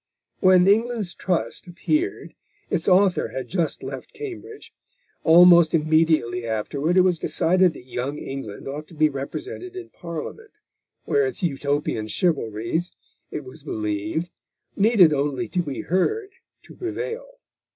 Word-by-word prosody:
When 185 Hz, -1 st, +5 dB
England's 220 Hz, -2 st, +2 dB
Trust 180 Hz, 0 st, -2 dB
appeared, 310 Hz, -, -2 dB, 0.4 s
its 175 Hz, -3 st, -1 dB
author 190 Hz, 0 st, +4 dB
had 130 Hz, -, -6 dB
just 170 Hz, -5 st, -1 dB
left 135 Hz, -1 st, -7 dB
Cambridge. 430 Hz, +1 st, -8 dB, 0.5 s
Almost 170 Hz, 0 st, +7 dB
immediately 155 Hz, -6 st, +2 dB
afterward, 140 Hz, -, -1 dB
it -, -, +8 dB
was 180 Hz, -3 st, +2 dB
decided 180 Hz, 0 st, +2 dB
that -, -, -11 dB
Young 130 Hz, +3 st, -4 dB
England 135 Hz, -8 st, -7 dB
ought 150 Hz, +3 st, -6 dB
to 165 Hz, -, -14 dB
be 155 Hz, 0 st, +3 dB
represented 365 Hz, -, -6 dB
in 370 Hz, -1 st, -8 dB
Parliament, 175 Hz, -, -8 dB, 0.5 s
where 425 Hz, -1 st, +2 dB
its 390 Hz, -, -6 dB
Utopian 140 Hz, -7 st, -1 dB
chivalries, 115 Hz, -, -1 dB, 0.4 s
it 150 Hz, -, -5 dB
was 130 Hz, +4 st, -12 dB
believed, 110 Hz, -, -3 dB, 0.4 s
needed 200 Hz, -6 st, +5 dB
only 145 Hz, +4 st, -1 dB
to 180 Hz, -, 0 dB
be 145 Hz, -5 st, -4 dB
heard 390 Hz, -, 0 dB, 0.3 s
to -, -, -14 dB
prevail. 460 Hz, +7 st, -5 dB
170 Hz, 130 wpm, -23 LUFS, 140-195 Hz, 0.5 s, it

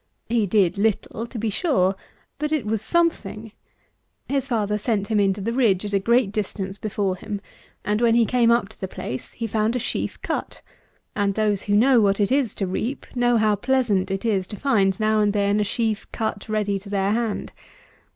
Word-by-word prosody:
He 225 Hz, -3 st, +2 dB
did 195 Hz, -1 st, +2 dB
little, 220 Hz, +2 st, -1 dB
to 235 Hz, -, -8 dB
be 225 Hz, 0 st, -1 dB
sure; 200 Hz, -, +1 dB, 0.4 s
but 300 Hz, 0 st, -2 dB
it 300 Hz, -8 st, 0 dB
was 215 Hz, 0 st, -1 dB
something. 225 Hz, -, -1 dB, 0.8 s
His 275 Hz, -1 st, -1 dB
father 210 Hz, -4 st, 0 dB
set 210 Hz, -2 st, -1 dB
him 215 Hz, -2 st, +2 dB
into 195 Hz, 0 st, +1 dB
the 230 Hz, +4 st, -2 dB
ridge 215 Hz, -7 st, +2 dB
at 205 Hz, -, -5 dB
a 200 Hz, -, +3 dB
great 235 Hz, +1 st, +2 dB
distance 200 Hz, -2 st, -4 dB
before 200 Hz, -3 st, -1 dB
him; 205 Hz, +2 st, -5 dB, 0.5 s
and 210 Hz, +2 st, 0 dB
when 230 Hz, -1 st, +4 dB
he 235 Hz, -1 st, +5 dB
came 240 Hz, 0 st, +3 dB
up 235 Hz, -3 st, +3 dB
to -, -, -18 dB
the 190 Hz, -, -2 dB
place, 130 Hz, -7 st, -6 dB
he 230 Hz, -, -4 dB
found 220 Hz, +1 st, 0 dB
a -, -, +2 dB
sheaf 245 Hz, -, -3 dB
cut; -, -, -4 dB, 0.5 s
and, 200 Hz, -2 st, 0 dB
those 210 Hz, -2 st, +1 dB
who 205 Hz, -, +2 dB
know 245 Hz, +2 st, +5 dB
what 200 Hz, -1 st, +2 dB
it 205 Hz, +2 st, +1 dB
is 270 Hz, -4 st, +1 dB
to 195 Hz, -, -1 dB
reap, 225 Hz, +8 st, -3 dB
know 245 Hz, -1 st, +3 dB
how 215 Hz, -1 st, +3 dB
pleasant 220 Hz, -5 st, +1 dB
it 195 Hz, +3 st, -3 dB
is 195 Hz, -5 st, +1 dB
to 210 Hz, -, -7 dB
find 200 Hz, -6 st, +1 dB
now 215 Hz, 0 st, +2 dB
and 205 Hz, -1 st, +2 dB
then 205 Hz, 0 st, +2 dB
a -, -, +3 dB
sheaf 220 Hz, 0 st, -2 dB
cut 220 Hz, -2 st, -3 dB
ready 205 Hz, -2 st, 0 dB
to 200 Hz, +1 st, -12 dB
their 200 Hz, 0 st, +1 dB
hand. 225 Hz, -1 st, -2 dB
215 Hz, 205 wpm, -23 LUFS, 200-235 Hz, 0.8 s, he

